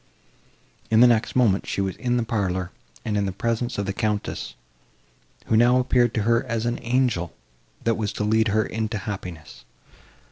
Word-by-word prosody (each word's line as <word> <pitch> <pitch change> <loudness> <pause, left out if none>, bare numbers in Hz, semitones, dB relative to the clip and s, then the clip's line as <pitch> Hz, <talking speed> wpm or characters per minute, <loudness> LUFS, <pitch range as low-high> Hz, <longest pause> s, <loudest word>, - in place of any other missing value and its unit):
In 110 - +4
the - - +9
next 115 -2 +1
moment, 110 -6 +2
she - - -3
was 95 -2 -1
in 125 0 0
the 120 - +1
parlour, 95 -6 -2 0.3
and 105 - -1
in 100 -1 +1
the - - -2
presence 115 +5 -2
of 100 - -1
the 100 - -2
Countess 105 0 -3 0.9
who - - +1
now 120 +3 +5
appeared 125 -2 +2
to 110 - +1
her 115 +2 +2
as 115 -2 -2
an 120 +1 -1
angel, 120 -8 0 0.5
that 115 - +2
was 105 -2 -2
to 105 - -3
lead 110 +1 +2
her 110 +1 +1
into 110 0 -3
happiness. 90 - -7
110 Hz, 180 wpm, -24 LUFS, 100-120 Hz, 0.9 s, the